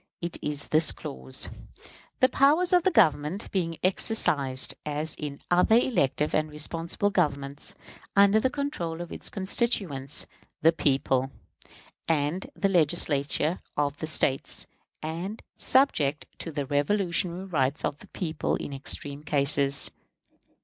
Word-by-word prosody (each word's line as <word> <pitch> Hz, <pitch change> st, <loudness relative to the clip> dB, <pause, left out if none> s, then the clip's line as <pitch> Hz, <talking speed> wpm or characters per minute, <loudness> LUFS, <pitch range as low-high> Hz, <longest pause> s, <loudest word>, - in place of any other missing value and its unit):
It 170 Hz, 0 st, -3 dB
is 145 Hz, -1 st, -2 dB
this 155 Hz, +1 st, +5 dB
clause: 65 Hz, 0 st, -4 dB, 0.7 s
"The 255 Hz, -, +7 dB
powers 300 Hz, +8 st, +3 dB
of 355 Hz, -, +6 dB
the 380 Hz, -, +3 dB
Government 165 Hz, -, +2 dB
being 165 Hz, -4 st, -1 dB
exercised, 145 Hz, -, +1 dB
as 150 Hz, +1 st, -3 dB
in 145 Hz, -2 st, -6 dB
other 180 Hz, +5 st, +5 dB
elective 150 Hz, -, +1 dB
and 155 Hz, 0 st, +1 dB
responsible 165 Hz, +6 st, -2 dB
governments, 140 Hz, -6 st, -2 dB, 0.4 s
under 200 Hz, +1 st, +6 dB
the 260 Hz, -, +1 dB
control 255 Hz, -, -3 dB
of 175 Hz, -1 st, -7 dB
its -, -, -2 dB
constituents, 190 Hz, -, -1 dB, 0.4 s
the 165 Hz, -, +7 dB
people, 135 Hz, -4 st, +1 dB, 0.8 s
and 160 Hz, +3 st, 0 dB
the 195 Hz, -, +1 dB
Legislatures 155 Hz, -2 st, +2 dB, 0.2 s
of 145 Hz, -1 st, 0 dB
the 160 Hz, -, -4 dB
States, 135 Hz, -3 st, 0 dB, 0.4 s
and 170 Hz, +7 st, -5 dB
subject 155 Hz, -, +2 dB
to 165 Hz, -, -5 dB
the 145 Hz, -2 st, -3 dB
revolutionary 175 Hz, +4 st, 0 dB
rights 145 Hz, -6 st, 0 dB
of 145 Hz, -, -3 dB
the -, -, -14 dB
people 160 Hz, -4 st, -2 dB
in 140 Hz, -, -6 dB
extreme 140 Hz, +1 st, -3 dB
cases." 140 Hz, -2 st, +3 dB
160 Hz, 130 wpm, -27 LUFS, 145-190 Hz, 0.8 s, The